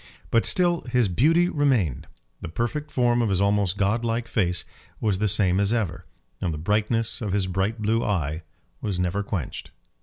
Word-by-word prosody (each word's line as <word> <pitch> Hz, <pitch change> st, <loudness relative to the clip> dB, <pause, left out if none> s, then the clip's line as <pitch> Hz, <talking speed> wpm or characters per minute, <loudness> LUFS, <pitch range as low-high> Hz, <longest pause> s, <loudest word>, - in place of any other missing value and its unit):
But 115 Hz, -, +3 dB
still 175 Hz, -2 st, +2 dB
his 125 Hz, -3 st, +3 dB
beauty 165 Hz, -, +3 dB
remained. 130 Hz, -, +1 dB, 0.3 s
The -, -, -6 dB
perfect 120 Hz, -, -3 dB
form 120 Hz, -1 st, +2 dB
of 115 Hz, -, +1 dB
his 95 Hz, -2 st, +1 dB
almost 100 Hz, -1 st, +1 dB
god 105 Hz, +4 st, +1 dB
like 115 Hz, 0 st, -1 dB
face 90 Hz, -6 st, +1 dB, 0.3 s
was 105 Hz, -4 st, 0 dB
the 105 Hz, -, +2 dB
same 95 Hz, -2 st, +2 dB
as 100 Hz, +1 st, +2 dB
ever, 105 Hz, -8 st, -2 dB, 0.3 s
and 90 Hz, -, 0 dB
the 75 Hz, -, -4 dB
brightness 110 Hz, +8 st, 0 dB
of 105 Hz, -4 st, -2 dB
his 100 Hz, -2 st, +1 dB
bright 95 Hz, +5 st, -1 dB
blue 110 Hz, +2 st, +1 dB
eye 80 Hz, -5 st, -1 dB, 0.4 s
was 100 Hz, -4 st, -2 dB
never 90 Hz, +3 st, 0 dB
quenched. 95 Hz, -8 st, -5 dB
105 Hz, 180 wpm, -25 LUFS, 95-115 Hz, 0.4 s, But